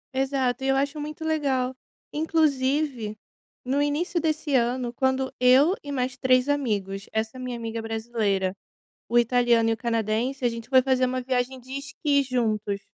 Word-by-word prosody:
Exato, 265 -1 0
e - - 0
eu 270 - +3
acho 280 +2 -1
muito 305 +2 -6
legal. 265 -5 0 0.4
Inclusive, 280 -7 0 0.5
no 275 +3 +1
início 320 +4 0
desse 310 -2 -1
ano, 245 0 +1
quando 265 +1 0
eu 260 +8 +6
e 285 - -6
mais 255 -2 -1
3 255 +1 +3
amigos; 205 -9 -1
essa 220 +3 -2
minha 250 -1 -4
amiga 230 0 -4
brasileira, 220 -4 -1 0.5
o 240 +1 +3
italiano 235 -1 +3
e - - +3
o - - -1
canadense; 230 +3 -1
a - - +5
gente 230 0 -7
foi 260 -1 +5
fazer 260 -1 +2
uma 255 0 -2
viagem 255 0 -1
de 255 +1 -12
esqui 280 0 0
juntos. 215 -6 -1
255 Hz, 160 wpm, -25 LUFS, 230-275 Hz, 0.5 s, eu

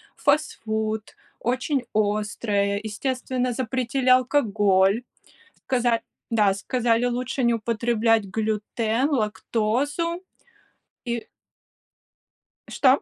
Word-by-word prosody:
фастфуд, 220 -7 -1 0.2
очень 255 +2 -1
острое, 205 -1 0
естественно, 250 +2 -2
запретили 255 +1 -1
алкоголь. 210 -5 +3 0.6
Сказа 240 -3 +2 0.3
да, 210 -4 +3
сказали, 235 +3 +1
лучше 250 +1 -1
не 235 - +4
употреблять 225 -1 +1
глютен, 220 +4 -1
лактозу. 255 - -1 0.8
И 235 -1 -3 1.4
Что? 265 0 +3
230 Hz, 75 wpm, -24 LUFS, 215-255 Hz, 1.4 s, не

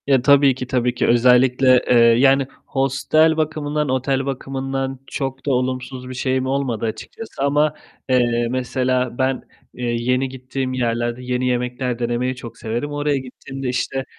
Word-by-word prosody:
Ya 135 -3 +4
tabii 140 0 +5
ki, 125 -1 -6
tabii 125 -1 0
ki - - 0
özellikle, 125 +1 +5
eee, 125 - +5
yani 125 +4 +5 0.2
hostel 145 +4 +2
bakımından, 150 -1 -1
otel 130 +1 0
bakımından 135 0 -3
çok 135 -2 -4
da 145 - +1
olumsuz 130 0 -3
bir - - -6
şeyim 130 0 -1
olmadı 130 -4 -1
açıkçası 135 - -6
ama, 145 +1 +2 0.4
eee, 120 -2 +2
mesela 125 0 -1
ben, 130 -1 0 0.3
eee, 125 - -5
yeni 125 +2 0
gittiğim 130 0 -4
yerlerde 120 0 -1
yeni 125 0 -1
yemekler 125 0 -2
denemeyi 120 +2 -1
çok 115 -3 -10
severim. 120 +6 -3
Oraya 145 -1 0
gittiğimde 130 0 -6
işte 130 +1 -2
130 Hz, 150 wpm, -20 LUFS, 125-135 Hz, 0.4 s, tabii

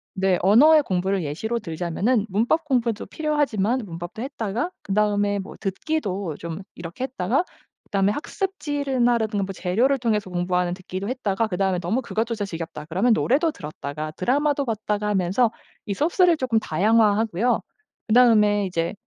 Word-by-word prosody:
네, 190 -2 +2
언어의 295 - +6
공부를 190 - -1
예시로 220 +11 -2
들자면은 195 +5 -1
문법 235 - +1
공부도 240 -6 0
필요하지만 270 -7 0
문법도 175 +3 -7
했다가 245 - -3
그다음에 205 0 +1
뭐 195 - -8
듣기도 195 - -2
좀 165 +1 -6 0.2
이렇게 170 +9 -5
했다가 250 - 0 0.4
그다음에 195 -1 +1
학습지를 290 - -2
나 240 -1 +4
라든가 215 -3 -1
뭐 195 0 -5
재료를 230 +11 +1
통해서 215 -6 -1
공부하는 180 0 0
듣기도 185 +3 -6
했다가 225 -4 -1
그 180 -4 -4
다음에 190 -2 +1
'너무 215 +10 -1
그것조차 225 -2 -2
지겹다.' 165 -4 -6
그러면 205 +8 +3
노래도 290 +9 +2
들었다가 155 - -6
드라마도 280 - 0
봤다가 210 -2 -2
하면서 200 +4 +2 0.4
이 200 - -2
소스를 345 +2 +3
조금 245 -5 +1
다양화하고요. 215 +3 +2 0.5
그 215 - +1
다음에 210 -5 +5
이제 170 -1 -2
210 Hz, 395 characters per minute, -23 LUFS, 185-250 Hz, 0.5 s, 언어의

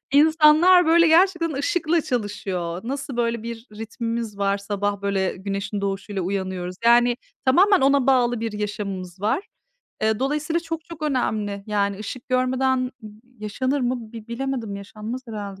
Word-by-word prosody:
İnsanlar, 315 +4 +6
böyle, 335 +1 +6
gerçekten 340 0 +4
ışıkla 330 +3 +1
çalışıyor. 195 - -3
Nasıl 270 +1 -4
böyle 235 -1 0
bir 230 0 -7
ritmimiz 230 -1 -4
var, 200 0 +1
sabah, 200 0 -2
böyle, 195 -2 0
güneşin 200 +1 -4
doğuşuyla 200 0 -3
uyanıyoruz, 185 -1 -3
yani, 240 +1 +5 0.3
tamamen 370 +8 +5
ona 275 -1 +3
bağlı 245 -3 +3
bir 225 -1 -3
yaşamımız 200 -3 -5
var. 220 - 0 0.6
Eee, 220 -1 +2
dolayısıyla 300 +5 0
çok 325 -1 -5
çok 335 -2 -11
önemli. 215 -8 -1
Yani 200 -2 0
ışık 235 +5 -7
görmeden 255 0 +1 0.2
n 215 -1 -10 0.3
yaşanır 255 +7 -1
mı 245 -3 -2
bi 225 -1 -10
bilemedim 235 -4 -3
yaşanmaz 215 +5 -6
herhalde. 200 -3 -6
235 Hz, 140 wpm, -23 LUFS, 200-275 Hz, 0.6 s, İnsanlar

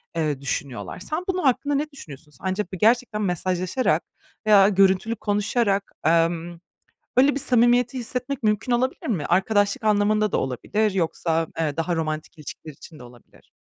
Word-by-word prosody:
eee, 150 -4 -1
düşünüyorlar. 140 +2 -4
Sen, 310 - -4
bunun 370 -2 -1
hakkında 285 +2 +1
ne 300 +2 -2
düşünüyorsun? 150 - -12
Sence 190 +2 -1
b 190 0 -9
gerçekten 225 +2 +2
mesajlaşarak 185 +4 0 0.4
veya 200 -2 +7
görüntülü 195 +3 +2
konuşarak, 205 -1 0
emm, 170 +1 +1 0.6
böyle 275 +2 +5
bir - - -1
samimiyeti 245 0 +3
hissetmek 250 +2 -4
mümkün 210 +4 0
olabilir 255 +2 0
mi? 180 -11 -1
Arkadaşlık 200 +3 +1
anlamında 215 0 +2
da - - +1
olabilir, 210 - -1
yoksa, 165 -2 -1
eee, 155 -2 -1
daha 170 +1 -1
romantik 155 +1 -4
ilişkiler 155 0 -9
için 155 +3 -14
de - - -11
olabilir. 120 -1 -18
200 Hz, 150 wpm, -23 LUFS, 165-235 Hz, 0.6 s, veya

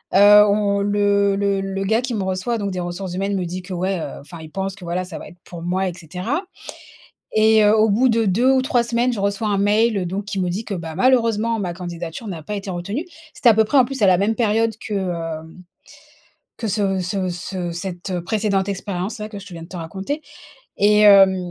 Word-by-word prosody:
Heu, 205 +1 +8
on 200 -1 +1
le 200 0 +2
le 200 -1 0
le 195 0 -3
gars 220 +4 +2
qui 250 -1 -3
me 210 -4 -1
reçoit, 190 +5 -1
donc 200 -2 -3
des 185 - -4
ressources 175 +1 -4
humaines, 195 +2 -1
me 185 -2 -1
dit 180 +2 -5
que 185 +1 -8
ouais, 185 +1 -1
heu, 145 - -6
enfin 165 +4 -11
il 160 -1 -11
pense 195 +1 -3
que 200 - -14
voilà 175 +2 -2
ça 180 -3 -8
va - - -10
être 175 - -15
pour 170 -2 -9
moi 185 +3 -1
et 180 - -3
cetera. 185 - -4 0.9
Et 220 0 +5
heu, 210 +1 +5
au 220 0 +4
bout 240 +6 +3
de 230 -1 +2
2 225 +7 +3
ou 265 -1 +3
3 245 -2 +2
semaines 235 +1 0
je 220 - -3
reçois 200 +2 -1
un 200 -1 +1
mail, 210 +2 +2
heu, 180 - -2
donc 195 +4 -4
qui 200 -2 -3
me 180 - 0
dit 200 +6 -3
que, 205 - -4
bah, 165 -3 -6
malheureusement 230 -1 +2
ma 180 -3 -2
candidature 175 +3 -7
n'a 170 -5 -6
pas 210 - -5
été 200 -1 -5
retenue. 200 - -4 0.3
C'était 240 - +4
à - - +5
peu 220 +1 +4
près 275 +6 +2
en 255 - +6
plus 270 -1 -5
à - - +6
la 180 -1 +5
même 205 +4 +1
période 225 0 +1
que, 215 - -3
heu, 165 -4 -4 1.0
que 230 - -3
ce 195 -2 0
ce 185 +1 -2
ce 175 0 -4
cette, 175 +1 -5
heu, 180 -2 -2
précédente 205 -1 0
expérience 195 +1 -4
là, 210 - -4
que 210 -2 -8
je 200 - -12
te 195 - -11
viens 165 -1 -8
de 165 - -11
te 185 - -9
raconter. 190 - -4 0.6
Et 210 +1 +4
hem, 195 -2 +7
200 Hz, 245 wpm, -21 LUFS, 180-215 Hz, 1.0 s, Heu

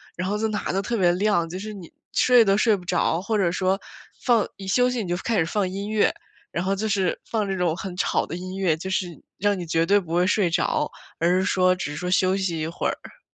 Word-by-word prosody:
然 180 +1 -3
后 205 +2 0
就 220 +1 0
哪 210 -3 -2
都 195 - +1
特 230 +4 -2
别 180 -4 +4
亮， 185 -2 +1
就 180 - -5
是 215 +3 -6
你 185 -5 -10 0.2
睡 250 -2 +5
都 195 -2 +3
睡 215 0 +4
不 185 - -8
着， 170 -1 +1
或 215 +3 -1
者 190 -4 +2
说 190 +1 +1 0.5
放 235 -4 +4
一 195 - -8
休 250 +6 +3
息 250 -2 -2
你 200 - -4
就 175 - +1
开 225 +4 -1
始 165 - +3
放 190 +2 -1
音 200 +2 -5
乐， 215 -1 +2 0.4
然 170 - -2
后 195 +1 +1
就 215 +2 -2
是 195 -3 +1
放 215 -3 -1
这 195 - -1
种 180 -3 +1
很 190 -2 -6
吵 180 - 0
的 160 - -6
音 185 +1 -6
乐， 185 -5 +2
就 175 +4 -6
是 190 -1 0 0.3
让 205 0 +1
你 180 - -5
绝 165 0 +1
对 200 +3 +4
不 175 -5 -3
会 175 +1 +3
睡 205 -3 +2
着， 165 - 0 0.3
而 175 +2 +3
是 190 - 0
说 185 -2 +3
只 180 -5 -4
是 - - -6
说 180 +2 -3
休 185 0 +3
息 190 -4 -1
一 155 - -2
会 165 - -2
儿。 - - -8
190 Hz, 285 characters per minute, -24 LUFS, 180-205 Hz, 0.5 s, 睡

